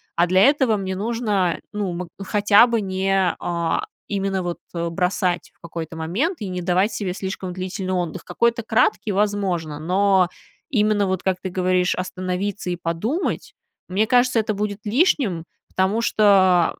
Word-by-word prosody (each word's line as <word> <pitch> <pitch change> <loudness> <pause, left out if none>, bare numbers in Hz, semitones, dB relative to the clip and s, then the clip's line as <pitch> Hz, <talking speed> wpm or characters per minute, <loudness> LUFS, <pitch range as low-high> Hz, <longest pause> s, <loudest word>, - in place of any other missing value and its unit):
а 170 - +4
для 185 +2 +3
этого 265 -2 +4
мне 190 -1 -3
нужно, 210 -4 0
ну, 205 -3 -2
ма 175 +1 -5 0.2
хотя 205 +2 +5
бы 235 -2 0
не, 190 -1 +1
а, 170 - -1 0.3
именно 195 -2 -1
вот 175 -1 -4
бросать 175 +1 -1
в - - -39
какой-то 165 -1 -6
момент 190 - -1
и 200 - -3
не 180 0 -3
давать 185 +4 +2
себе 190 -4 -3
слишком 190 -1 -5
длительный 185 +1 -4
отдых. 175 -3 -2
Какой-то 235 +6 +1
краткий, 220 -1 +1
возможно, 190 -7 -1
но 190 +3 +3 0.4
именно 210 -4 +2
вот, 190 -1 -2
как 190 -1 +1
ты 190 - -4
говоришь, 180 0 +1
остановиться 185 +2 -3
и 175 - -1
подумать, 175 - -2 0.3
мне 195 +4 +1
кажется, 245 +1 +3
это 215 0 0
будет 205 0 -3
лишним. 225 - +1 0.2
Потому 190 +4 +1
что, 190 -6 +4
190 Hz, 155 wpm, -22 LUFS, 180-210 Hz, 0.4 s, хотя